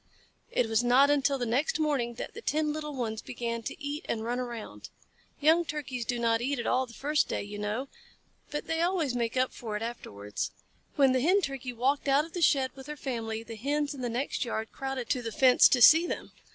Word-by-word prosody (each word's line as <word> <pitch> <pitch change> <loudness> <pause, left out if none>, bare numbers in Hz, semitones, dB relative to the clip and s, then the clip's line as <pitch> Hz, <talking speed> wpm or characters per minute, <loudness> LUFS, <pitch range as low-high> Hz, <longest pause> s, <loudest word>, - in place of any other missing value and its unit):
It 240 - +1
was 225 +2 +2
not 260 +4 +5
until 280 -1 +2
the 245 - -2
next 270 - +1
morning 270 -6 0
that - - -6
the 460 - -8
ten 305 -6 0
little 300 -1 -5
ones 220 -4 -3
began 235 -1 -4
to - - -6
eat 290 +3 -4
and - - 0
to - - -5
run 240 +2 -2
around. 240 -3 -7 0.5
Young 320 +4 +4
Turkeys 275 -6 -4
do 245 0 -1
not 230 -1 +1
eat 275 +3 -1
at 235 - -3
all 255 0 +1
the 235 - -13
first 295 +1 +1
day, - - -2
you 205 0 -7
know, 215 +6 -2 0.6
but 295 - -4
they 325 0 -1
always 340 -6 +1
make 235 0 -1
up 255 0 +1
for 215 -3 -4
it 215 - -5
afterwards. 105 - -5 0.5
When 275 -3 +5
the 255 -1 +2
Hen 370 +8 +4
Turkey 270 -5 -4
walked 270 +5 0
out 280 +2 +4
of 325 - -14
the 355 - -3
shed 270 -4 +3
with 265 0 -11
her 300 0 -6
family, 225 -4 -4
the 230 0 -8
Hens 290 +6 -1
in 275 - -8
the 245 - -2
next 250 +5 -2
yard 220 -2 -4
crowded 270 -3 -4
to 255 - +1
the 230 -1 -4
fence 255 +3 +6
to 245 -2 +4
see 325 +6 +8
them. - - -5
260 Hz, 230 wpm, -29 LUFS, 235-290 Hz, 0.6 s, see